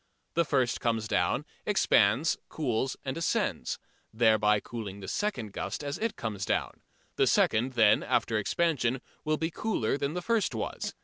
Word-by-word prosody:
The 170 0 +2
first 130 -5 +1
comes 115 -2 0
down, - - +1 0.2
expands, 115 +11 +3
cools 130 -3 -1
and 130 - -2
ascends, 165 - -1 0.3
thereby 110 -2 +4
cooling 105 -3 -7
the 95 - -8
second 120 - -2
gust - - -4
as 140 0 -4
it 225 -1 -1
comes 105 -4 -4
down. - - -1 0.4
The - - +4
second 120 +4 +2
then, 110 -4 +5
after 110 -2 +1
expansion, 130 0 0 0.2
will 155 0 +1
be 160 +2 -2
cooler 145 - -1
than 140 +3 -2
the 180 - -3
first 230 -1 +1
was. - - -4
125 Hz, 160 wpm, -29 LUFS, 110-155 Hz, 0.4 s, then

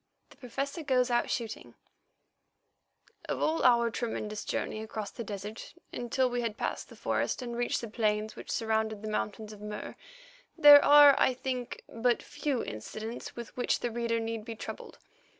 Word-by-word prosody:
THE - - -17
PROFESSOR 275 +6 -4
GOES 255 -4 +2
OUT 240 - +2
SHOOTING 230 -3 -4 1.5
Of - - -1
all 320 +1 +1
our 235 -2 +5
tremendous 215 -3 -3
journey 215 - -3
across 215 -1 -5
the 235 - -6
desert 205 - -7 0.2
until 250 +2 0
we 245 0 -1
had 230 -2 -3
passed - - -3
the - - -12
forest - - -1
and 240 -1 -5
reached 240 0 0
the 235 - -5
plains 215 -1 -1
which - - -10
surrounded 220 -2 -1
the - - -4
mountains 215 0 -3
of 205 - -13
Mur, 210 0 -6 0.6
there 290 -2 +10
are, 290 -1 +9
I 255 - +3
think, 255 -1 -4
but 235 +1 0
few 290 -3 -2
incidents 215 - -6
with 235 -1 -8
which 250 - 0
the 240 - -1
reader 230 0 -1
need 225 -1 -3
be 225 0 -7
troubled. - - -8
235 Hz, 170 wpm, -30 LUFS, 215-250 Hz, 1.5 s, there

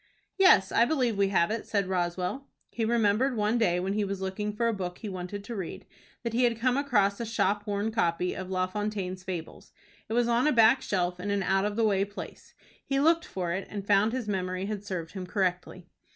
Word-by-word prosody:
"Yes, 195 - +6
I 230 - +4
believe 250 -5 +1
we 200 0 +2
have 190 -1 +2
it," 225 - -3
said 200 -2 0
Roswell. 180 +7 -2 0.2
He 230 - -1
remembered 230 +3 +2
one 215 +3 +1
day 180 -6 +2
when 190 +2 -1
he 210 0 0
was 200 -1 -3
looking 190 +2 -3
for 230 +3 0
a 230 - +1
book 180 -3 -4
he 215 - -6
wanted 185 +2 -6
to 230 +3 -6
read, 190 -5 -6 0.4
that 235 -1 -3
he 245 +2 +2
had 235 -2 +2
come 250 +1 +2
across 210 -8 +2
a - - -2
shop 205 -1 0
worn 205 +2 -1
copy 180 -5 0
of 185 -1 -6
La 185 -1 +1
Fontaine's 190 -1 -4
Fables. 175 -4 -7 0.4
It - - -2
was 240 0 +2
on 240 +4 +2
a - - +4
back 230 +1 +5
shelf, 180 -2 -1
in 200 +3 -4
an 200 -1 0
out 195 +1 +2
of 210 0 -2
the 225 0 +2
way 195 -2 +2
place. 205 +1 -9 0.3
He 275 0 0
looked 330 +3 +3
for 180 -3 -3
it, 190 +1 -4
and 200 -2 -6
found 205 +2 +3
his 250 -3 -3
memory 185 -1 -2
had 205 -1 -4
served 180 -5 -5
him 185 -2 -6
correctly. 180 -1 -2
205 Hz, 225 wpm, -28 LUFS, 185-230 Hz, 0.4 s, Yes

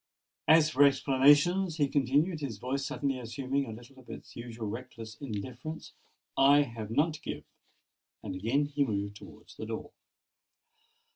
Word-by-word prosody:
As 155 -1 +6
for 145 0 +5
explanations," 145 +6 +4
he 145 -3 +3
continued, 145 +5 +1
his 135 -8 -4
voice 130 +5 -2
suddenly 135 -1 -2
assuming 130 +3 -2
a - - -6
little 120 +4 -12
of 130 - -17
its - - -10
usual 115 -2 -6
reckless 115 -1 -7
indifference, 130 +6 -6 0.4
"I 140 +2 +6
have 115 -5 -7
none 150 +8 +2
to 155 -1 -9
give." - - -5 0.8
And 95 - -5
again 115 +10 0
he 145 0 0
moved 100 -4 -2
towards - - -14
the - - -6
door. - - -5
135 Hz, 150 wpm, -30 LUFS, 115-145 Hz, 0.8 s, As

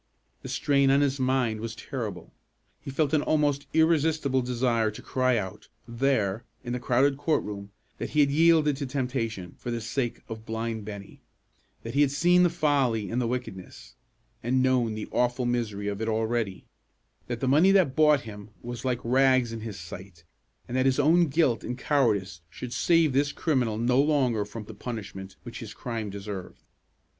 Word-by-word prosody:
The 130 - -8
strain 140 +1 +2
on 140 +1 +4
his 140 -1 +1
mind 130 -4 +1
was 115 0 -5
terrible. 110 - -6 0.5
He - - -8
felt 145 +2 0
an 155 - +4
almost 145 -2 +1
irresistible 160 -4 +2
desire 120 -2 +1
to 105 - -9
cry 130 -1 +1
out, 95 -3 -5 0.2
there, 115 -4 0 0.2
in 120 -1 -4
the 125 - -2
crowded 135 +3 +2
court 150 +2 +1
room, 100 -1 -7 0.3
that - - -3
he 150 - +3
had 140 -1 +3
yielded 155 -1 +4
to 140 -1 -4
temptation 120 -9 -3
for - - -6
the 120 -1 -2
sake 120 +2 -3
of 110 -1 -7
blind 110 -1 -4
Bennie; 100 -2 -9 0.6
that 115 - -6
he 140 - +3
had 145 - +4
seen 175 +5 +4
the 175 - +5
folly 140 - +1
and 120 +2 0
the 120 - 0
wickedness, 115 -1 -6 0.5
and 130 +2 +1
known 125 -4 +2
the 110 - -5
awful 125 +1 +1
misery 110 -4 -2
of 100 +1 -3
it 110 - -1
already; 110 -2 -1 0.6
that 120 -1 -3
the 130 - -1
money 155 +8 +5
that 185 -9 +3
bought 150 -3 +5
him 105 -2 -10
was 120 -1 -6
like 125 -2 0
rags 130 -1 +3
in 115 - -5
his 110 -3 -7
sight; 85 +1 -10 0.4
and 120 - -5
that 130 +1 +3
his 130 - +2
own 165 +4 +4
guilt 135 -6 +1
and 125 +1 -4
cowardice 105 - +1
should 125 +6 -7
save 165 -4 +3
this 145 +2 +2
criminal 125 -9 0
no 125 +3 +3
longer 130 -8 +1
from 110 +2 -8
the 110 - -10
punishment 100 -4 -7
which - - -8
his - - -8
crime 115 -3 -4
deserved. 100 -1 -7
125 Hz, 185 wpm, -27 LUFS, 110-140 Hz, 0.6 s, the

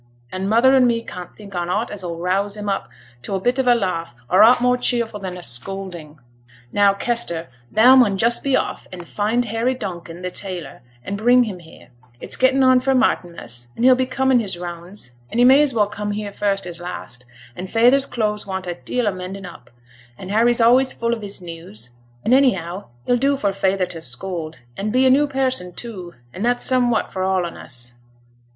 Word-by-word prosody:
An' 185 +1 -3
mother 235 +5 +5
and 260 -2 +5
me 230 -1 0
can't 180 -5 -9
think 205 -2 -12
on 175 -1 -3
aught 210 +6 -1
as 205 -2 -5
'll 170 -2 -5
rouse 195 +4 -1
him 210 0 -6
up 195 - -2 0.3
to 120 - -4
a - - -1
bit 245 +7 0
of 260 - +1
a 245 - +6
laugh, 170 - -2 0.2
or 185 - +6
aught 235 +3 +7
more 250 0 +3
cheerful 235 -3 0
than 185 -2 -6
a 180 - -8
scolding. 165 +4 -3 0.5
Now, 200 -1 +4
Kester, 200 -7 -2 0.2
thou 245 +5 +7
mun 220 -7 +4
just 235 +3 +2
be 275 -2 +1
off, - - -4
and 175 -2 -9
find 220 +4 0
Harry 230 +4 -1
Donkin 175 -6 -7
th' 180 0 -4
tailor, 185 -4 -6 0.2
and 200 +1 -4
bring 245 +3 +5
him 205 -6 -5
here; 165 -2 -16 0.3
it's - - -2
gettin' 265 +1 +3
on 255 -1 +6
for 265 +1 +1
Martinmas, 170 - -1
an' - - -2
he'll 260 +1 +7
be 255 0 0
coming 265 -1 +2
his 200 -6 -3
rounds, 175 -3 -7 0.2
and 235 - -2
he - - +6
may 265 +3 +7
as 295 -2 +3
well 220 -4 +2
come 205 0 -4
here 205 -1 -4
first 200 -1 -1
as 175 -1 -6
last, 125 -8 -7 0.3
and 185 +1 -7
feyther's 250 +6 +4
clothes 210 -4 -2
want 190 -1 -4
a 175 - -3
deal 240 +6 -2
o' - - +3
mending 185 +1 -7
up, 175 - -12 0.5
and 185 - -8
Harry's 235 +3 +3
always 250 +3 +4
full 235 0 -1
of 230 - -4
his 200 -2 -7
news, 165 - -9 0.3
and 240 - +3
anyhow 195 -9 +2 0.2
he'll 245 - +2
do 275 +3 +1
for 200 -6 0
feyther 195 -1 +1
to 175 -2 -9
scold, 160 +5 -3
an' 205 +2 -3
be 255 +4 +3
a 260 - +6
new 290 +3 +4
person 260 -9 -1
too, 185 -5 -8 0.2
and 190 - -5
that's 245 +1 +1
somewhat 245 -3 +1
for 185 - -3
all 185 -1 +1
on 170 - -7
us. 120 -1 -7
205 Hz, 210 wpm, -21 LUFS, 180-245 Hz, 0.5 s, aught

